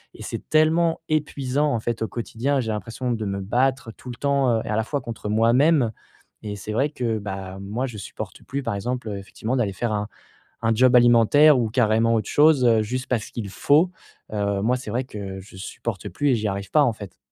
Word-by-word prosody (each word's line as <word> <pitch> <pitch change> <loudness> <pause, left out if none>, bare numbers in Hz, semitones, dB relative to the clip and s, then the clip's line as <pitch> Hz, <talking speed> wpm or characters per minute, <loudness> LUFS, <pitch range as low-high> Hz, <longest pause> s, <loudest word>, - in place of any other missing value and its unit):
et - - -10
c'est - - -6
tellement 160 +2 +3
épuisant 145 -2 0
en 115 - 0
fait 115 -1 -3
au 110 - -1
quotidien. 125 +4 -1
J'ai 110 -2 -3
l'impression 115 +4 -3
de 110 -2 -3
me 100 0 -3
battre 125 +4 0
tout 125 - -10
le - - -7
temps, 140 -3 +2
heu, - - -3
et - - -6
à 105 - 0
la 110 - +1
fois 145 +2 -2
contre 115 -3 -7
moi 115 +2 +3
même, 140 -3 +4 0.5
et 105 0 -4
c'est 105 +2 -6
vrai 135 +6 +1
que, 115 -6 -2
bah, 95 -1 -6
moi 110 +7 -3
je 110 -4 -8
supporte - - -8
plus 140 +2 -4
par 100 - -2
exemple, 120 +2 -3
heu, 100 - -4
effectivement 110 +5 -4
d'aller 105 -5 0
faire 115 +3 -2
un 105 0 -2 0.6
un 115 0 +2
job 125 +2 +5
alimentaire 120 +5 +6
ou 115 -2 0
carrément 115 -1 +2
autre 110 -3 -1
chose, 150 -3 +5
heu, 115 -2 +5
juste 125 +4 -3
parce 115 -3 -1
qu'il 105 -4 -5
faut, 145 - +3 0.4
heu, 100 -1 -1
moi, 125 +3 +2
c'est 125 -2 -8
vrai 125 +4 -1
que 100 -5 -7
je 95 0 -14
supporte 100 +1 -5
plus 145 - 0
et - - +4
j'y 105 -1 -1
arrive 100 0 -4
pas 150 - +5
en 125 -5 +3
fait. 100 -5 -10
115 Hz, 230 wpm, -23 LUFS, 105-130 Hz, 0.6 s, alimentaire